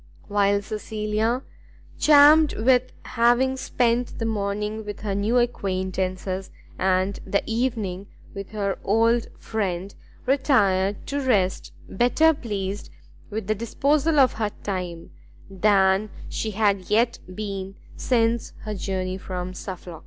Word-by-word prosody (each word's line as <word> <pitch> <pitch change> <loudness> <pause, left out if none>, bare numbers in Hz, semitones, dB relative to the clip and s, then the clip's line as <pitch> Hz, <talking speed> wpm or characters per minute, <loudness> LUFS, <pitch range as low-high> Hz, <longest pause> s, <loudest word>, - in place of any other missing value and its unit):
While 200 0 +2
Cecilia, 215 +3 -2 0.6
charmed 300 +1 +7
with 250 +2 +3
having 245 +3 +2
spent 245 -2 0
the 225 - -2
morning 210 0 -2
with 205 -1 -7
her 205 -2 -2
new 205 +5 +1
acquaintance, 190 -5 -1 0.5
and 190 +1 +1
the 200 +1 0
evening 220 -5 -2 0.3
with 195 -1 -7
her 200 -2 -2
old 230 +3 +2
friend, 195 -3 -3 0.3
retired 205 -8 +2
to 285 +1 -2
rest 205 -8 +1 0.2
better 280 +10 +3
pleased 205 -7 -4 0.4
with 215 -1 -4
the 215 - +1
disposal 280 +8 +1
of 260 -3 +5
her 220 -2 -1
time 180 -4 -4 0.4
than 195 +1 +3 0.2
she 220 - -3
had 200 -3 0
yet 230 +3 +2 0.2
been 195 -2 -5 0.2
since 230 -2 0
her 215 - -5
journey 185 -1 -3
from 185 -1 -5
Suffolk. 180 -3 -8
210 Hz, 120 wpm, -24 LUFS, 195-235 Hz, 0.6 s, charmed